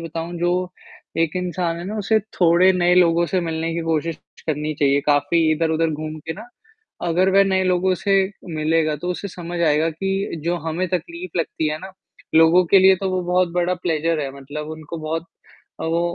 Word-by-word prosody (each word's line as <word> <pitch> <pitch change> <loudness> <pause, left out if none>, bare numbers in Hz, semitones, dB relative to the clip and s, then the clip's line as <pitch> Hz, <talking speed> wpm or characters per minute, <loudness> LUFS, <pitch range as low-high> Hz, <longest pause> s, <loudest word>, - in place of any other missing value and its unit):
बताऊँ 165 +1 -5
जो, 180 +1 0 0.5
एक 165 0 +1
इंसान 180 -2 -2
है 175 - -6
ना 215 +3 -4
उसे 220 +2 +2 0.2
थोड़े 175 +2 +5
नए 180 -1 +3
लोगों 170 -1 +4
से 185 0 0
मिलने 165 0 -2
की 170 - -2
कोशिश 160 +1 -1 0.3
करनी 155 0 -2
चाहिए 140 0 +3
काफ़ी 145 +3 +3
इधर-उधर 160 0 +1
घूम 155 +1 -5
के 160 - -2
ना, 220 +8 -11 0.6
अगर 185 +3 +2
वह 195 +1 +6
नए 190 -1 +1
लोगों 185 0 +2
से 195 -1 +4 0.4
मिलेगा 155 0 +1
तो 175 +5 -5
उसे 200 +3 -4
समझ 175 -1 -6
आएगा 160 0 +2
कि 195 0 -3
जो 175 +1 0
हमें 175 +3 -2
तकलीफ़ 175 0 -4
लगती 160 -1 -1
है 155 +1 -3
ना, 190 +2 -10 0.4
लोगों 165 +3 +6
के 195 - +6
लिए 190 0 +6
तो 190 +1 -2
वो 185 -1 -1
बहुत 180 0 +3
बड़ा 180 +1 +1
प्लेज़र 165 -1 0
है 135 -1 -3
मतलब 150 +3 -7
उनको 160 +1 -7
बहुत 160 +2 -3 0.6
अ, - - -3
वो 165 +1 +1
170 Hz, 195 wpm, -21 LUFS, 160-180 Hz, 0.6 s, वह